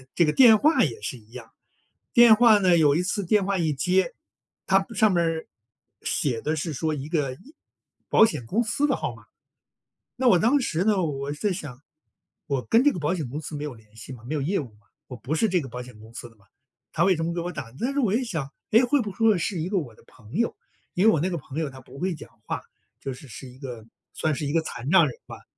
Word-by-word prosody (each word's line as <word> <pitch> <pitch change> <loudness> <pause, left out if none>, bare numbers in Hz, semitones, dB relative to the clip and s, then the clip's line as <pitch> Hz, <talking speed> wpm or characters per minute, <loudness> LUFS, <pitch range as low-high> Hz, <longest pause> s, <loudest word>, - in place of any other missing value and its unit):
这 170 - +4
个 150 - +2
电 235 -5 +7
话 310 +9 +3
也 120 -9 -2
是 115 +4 -5
一 110 -1 -21
样。 120 -2 -11 0.6
电 235 -2 +8
话 225 -1 +6
呢， 180 -3 +4
有 150 -3 +4
一 170 - +2
次 195 +2 -2
电 200 +2 +2
话 200 0 0
一 160 -4 0
接， 185 - +1 0.5
它 195 0 +3
上 215 0 +3
面 175 -2 +2
儿， 165 -1 -2 0.5
写 120 -5 -1
的 155 +1 -1
是 160 +1 -3
说 155 +3 -1
一 145 -1 -5
个 150 -5 -1
一 225 - -17 0.5
保 220 - +6
险 170 - -3
公 220 - 0
司 260 +6 0
的 280 - +2
号 - - -4
码。 - - -17 0.9
那 255 0 +2
我 185 - +6
当 245 +10 +3
时 180 -8 -1
呢， 205 -3 +2
我 140 -3 -3
在 190 +7 -1
想： 145 -8 -8 0.6
“我 140 -5 -2
跟 230 +3 +3
这 290 - +5
个 175 - -5
保 150 +2 0
险 160 -8 -3
公 145 +5 -5
司 155 0 -7
没 145 - -5
有 150 -4 -5
联 110 -1 -21
系 115 +4 -9
嘛， 120 -2 -11
没 150 +6 -3
有 - - -1
业 175 +8 0
务， 125 -7 -9 0.4
我 125 - -7
不 135 +5 -4
是 220 +8 +2
这 185 -2 +1
个 135 - -7
保 125 +1 -6
险 125 -3 -13
公 110 +2 -15
司 120 - -8
的 115 - -24
嘛， 100 -2 -27 0.5
它 - - 0
为 190 -2 +4
什 160 - -2
么 170 +1 -2
给 170 - -2
我 175 +1 -3
打？ 130 -9 -7
“但 255 +3 0
是 280 - -3
我 225 -8 +2
一 245 - +1
想 165 - -4 0.2
“哎， 225 - +6
会 270 +2 +2
不 210 - -5
会 220 +1 +3
是 175 0 -2
一 165 - -2
个 200 - -1
我 130 -10 -6
的 - - -21
朋 115 -4 -16
友”， 230 +5 0 0.4
因 180 - +1
为 225 - +7
我 155 - +1
那 175 - 0
个 180 - -2
朋 140 -1 -8
友 160 -2 -1
他 130 -1 -12
不 130 - -14
会 180 +3 -1
讲 150 - -11
话， - - -4 0.4
就 135 - -4
是 130 +3 -11
是 130 +1 -10
一 125 +1 -15
个 125 -5 -8 0.3
算 155 - -1
是 145 +1 -3
一 140 - -2
个 165 0 +2
残 130 -4 -7
障 170 -3 +6
人 125 - -7
吧。 - - -11
160 Hz, 280 characters per minute, -25 LUFS, 135-200 Hz, 0.9 s, 电